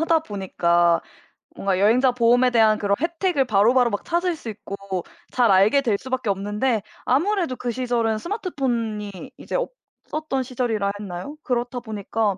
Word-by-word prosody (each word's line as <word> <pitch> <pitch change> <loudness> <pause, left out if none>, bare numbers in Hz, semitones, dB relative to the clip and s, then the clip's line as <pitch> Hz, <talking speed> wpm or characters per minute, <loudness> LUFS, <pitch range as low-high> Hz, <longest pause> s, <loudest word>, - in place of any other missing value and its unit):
하다 325 0 +3
보니까 175 - +1 0.6
뭔가 195 -2 0
여행자 245 +6 +4
보험에 245 +1 +4
대한 220 -3 +4
그런 200 -1 +1
혜택을 335 -2 0
바로 215 0 +4
바로 250 -2 +4
막 205 -2 -3
찾을 345 +1 0
수 245 - -8
있고 200 -3 -5 0.3
잘 240 -4 +3
알게 200 +9 +5
될 225 -7 +1
수 260 - -10
밖에 255 -4 -1
없는데 210 +4 0 0.2
아무래도 335 +1 +1
그 245 -1 -3
시절은 235 -2 0
스마트폰이 240 - -2 0.3
이제 - - -6 0.5
없었던 305 -4 -2
시절이라 235 -6 -1
했나요? 200 +9 -6
그렇다 245 0 -1
보니까 215 -2 -2
235 Hz, 345 characters per minute, -23 LUFS, 205-265 Hz, 0.6 s, 알게